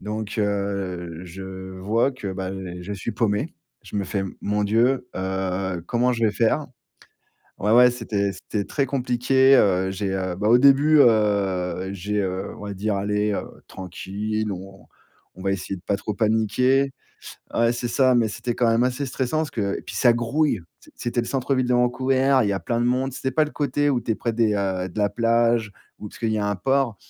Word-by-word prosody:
Donc 105 0 -5
heu, 100 -5 -2
je 95 +1 -8
vois 115 +7 +2
que 115 -6 -6
bah, 95 0 -4 0.3
je 95 +3 -6
suis 100 +3 -4
paumé. 105 -3 -1 0.3
Je - - -12
me 100 - 0
fais: 95 +1 -2 0.2
«Mon 105 0 0
Dieu, 120 +6 +2
heu, 95 -1 -2
comment 125 +3 +1
je 115 -1 0
vais 105 - +2
faire?» 115 +8 +1 0.9
Ouais, 105 - +1
ouais, 125 +2 +7
c'était 105 -5 -2
c'était 100 0 -4
très 140 -2 -1
compliqué, 130 +1 +3
heu, 95 -3 +2
j'ai, 95 0 -2
heu, 95 -2 -2
bah 105 +4 0
au 120 - +7
début, 140 +4 +5
heu, 100 -6 +2
j'ai, 100 +2 -2
heu, 95 -1 -3
on 105 - -8
va 100 - -4
dire: 100 +2 -1
«Allez, 105 +1 0
heu, - - -3 0.2
tranquille, 105 +4 -4
on 95 +1 -9 0.5
on 95 - -11
va 95 - +1
essayer 95 0 -4
de 90 - -15
pas 100 - +1
trop 105 - -4
paniquer» 115 +6 +2 0.6
ouais 115 0 +3
c'est 120 0 -3
ça, 130 +1 +3
mais 115 -2 +3
c'était 120 +3 -3
quand 120 0 +2
même 115 +2 +3
assez 130 +2 -1
stressant, 130 +3 -2
parce 155 -1 -1
que 100 -3 -2
et - - -10
puis - - -9
ça 120 - +5
grouille. 120 +1 0 0.2
C - - -19
c'était 120 0 -1
le - - -6
centre-ville 130 0 0
de 125 - +3
Vancouver, 130 +2 +2
il 105 - +1
y - - +1
a 95 - -2
plein 120 -1 -1
de 120 - +1
monde, 130 +2 0
c'était 130 +1 -3
pas 155 - +3
le 150 - -7
côté 145 0 0
où 125 -3 +1
tu 115 - -1
es - - -1
près 115 +2 -2
des, 110 -2 +2
heu, 95 -2 -1
de 90 - -9
la 105 - +3
plage, 115 0 +2 0.3
ou, - - -8
parce - - -14
qu'il 115 - 0
y 110 - 0
a 105 - -1
un 105 - 0
port. 130 +2 +1
110 Hz, 210 wpm, -23 LUFS, 100-125 Hz, 0.9 s, ouais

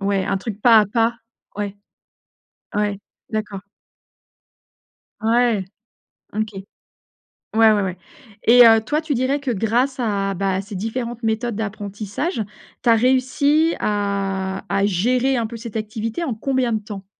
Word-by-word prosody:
Ouais, 195 -1 0
un 195 - 0
truc 205 +1 -6
pas 225 -1 +7
à 210 - +1
pas. 230 +3 +1 0.4
Ouais, 205 -1 -4 1.0
ouais, 205 -1 0 0.3
d'accord. 215 -3 -4 1.6
Ouais, 230 -2 +2 0.7
OK. 215 0 -1 1.1
Ouais, 225 0 +7
ouais, 210 -1 +2
ouais, 185 -1 -3 0.5
et 245 +1 +8
heu, 225 -1 +6
toi 295 +7 0
tu 315 -2 -2
dirais 260 +3 0
que 280 -2 -4
grâce 240 +5 +1
à 200 -3 0
bah 195 0 -1
à 190 - -1
ces 200 +1 -9
différentes 235 +4 -4
méthodes 225 +1 -1
d'apprentissage, 210 - -3 0.4
tu 240 - +3
as 230 - +7
réussi 265 +6 +2
à 195 -2 -1
à 200 0 +1
gérer 245 +7 +1
un 230 - -1
peu 235 - -8
cette 230 -1 -6
activité 220 +8 -3
en 260 - -2
combien 255 +1 0
de 220 - +1
temps? 200 -2 -8
220 Hz, 145 wpm, -21 LUFS, 200-245 Hz, 1.6 s, et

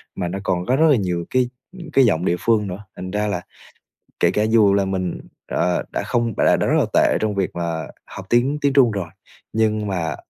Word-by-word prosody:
mà 90 -2 -2
nó 95 +3 -4
còn 90 -2 -1
có 130 - +2
rất 150 - 0
rất 160 - +5
là 140 - +4
nhiều 90 -4 -2
cái, 125 -1 +1 0.3
ừm, 170 -3 -9
cái 135 - +5
giọng 85 -5 +1
địa 90 - +2
phương 110 -3 +1
nữa. 95 +2 -7
Thành 95 0 -7
ra 105 +1 -1
là 100 -4 -2 0.8
kể - - +3
cả 105 - +1
dù 110 -3 +4
là 100 0 +2
mình, 95 -2 -3 0.3
ờ, 90 0 0
đã - - -2
không 115 -1 -1
đã - - +4
đã - - 0
rất - - +2
là - - +2
tệ - - +3
trong 105 -1 -1
việc 95 -2 0
mà 85 -3 -3 0.2
học 95 - -10
tiếng 125 +5 +2
tiếng 140 -1 +2
Trung 130 -5 +5
rồi, 100 -4 -3 0.5
nhưng 110 -1 +1
mà 90 -4 -2
100 Hz, 240 wpm, -21 LUFS, 90-115 Hz, 0.8 s, rất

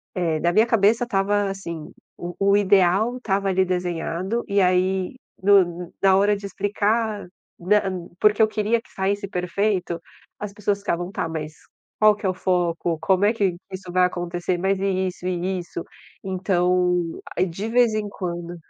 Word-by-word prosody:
eh, 165 -4 0
na 170 +2 +1
minha 215 +4 +5
cabeça 230 0 +3
estava, 205 -2 +1
assim, 170 -5 -6 0.3
o 175 0 -6
o 200 0 +4
ideal 200 +4 +3
estava 200 -5 -1
ali 190 0 +2
desenhad,o 180 +4 -2
e 200 0 +2
aí 185 +2 +1 0.3
no 180 -3 +3
na 195 -1 +5
hora 205 +1 +3
de 200 - -9
explicar 205 +1 -1 0.3
nam 185 -1 0
porque 210 +1 +4
eu 220 - +6
queria 215 +2 0
que - - -24
saísse 200 +1 -1
perfeito, 180 -1 -1 0.4
as 205 -1 -5
pessoas 205 -1 -1
ficavam: 175 -1 -2
"Tá 195 -6 -2
mas, 155 -1 -5 0.5
qual 215 -1 +6
que 205 - -8
é - - +3
o 185 - 0
foco? 175 -3 0
Como 185 +5 +2
é 215 - +3
que 195 -5 0 0.2
isso 185 -1 -7
vai 180 0 +4
acontecer? 175 0 -2
Mas 195 +2 0
e 190 -1 0
isso 180 0 -7
e 185 +1 -1
isso?" 170 -1 -6 0.4
Então 180 -2 +1 0.2
aí 185 - +3
de 190 +5 -5
vez 240 -2 +3
em 210 -1 -1
quando 175 -3 -5
190 Hz, 170 wpm, -23 LUFS, 175-205 Hz, 0.5 s, eu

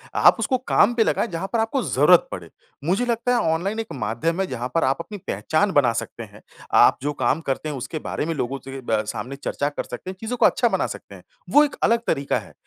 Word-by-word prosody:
आप - - +6
उसको 260 - +1
काम 240 -3 +3
पे 235 -2 +3
लगाएँ 230 - 0
जहाँ 175 -1 -4
पर 230 - +2
आपको 225 +4 0
ज़रूरत 150 +6 +4
पड़े। 85 -3 -7 0.3
मुझे 190 +10 +1
लगता 235 +1 0
है - - +3 0.2
ऑनलाइन 195 +7 -2
एक 225 - -3
माध्यम 145 +7 -2
है - - +1
जहाँ 125 -4 -4
पर 165 - +3
आप 135 +1 +2
अपनी 205 +5 -7
पहचान 195 +6 0
बना 125 -5 +4
सकते 115 +1 -5
हैं, 105 -1 -14 0.3
आप - - +6
जो 145 +2 -2
काम 135 +3 0
करते 135 +3 -2
हैं 150 - -4
उसके 140 +4 -5
बारे 150 - -3
में 165 - -1
लोगों 135 0 -3
से 135 0 -7
ब 110 -1 +2 0.2
सामने 135 +3 -6
चर्चा 140 0 -2
कर 145 - -4
सकते 125 +9 -8
हैं 190 - -6
चीज़ों 235 +3 -4
को - - +4
अच्छा - - +3
बना - - 0
सकते - - -9
हैं, - - -14 0.3
वो 295 - +6
एक 295 - -2
अलग 230 +1 +4
तरीक़ा 140 0 0
है। - - -14
160 Hz, 245 wpm, -23 LUFS, 135-220 Hz, 0.3 s, आप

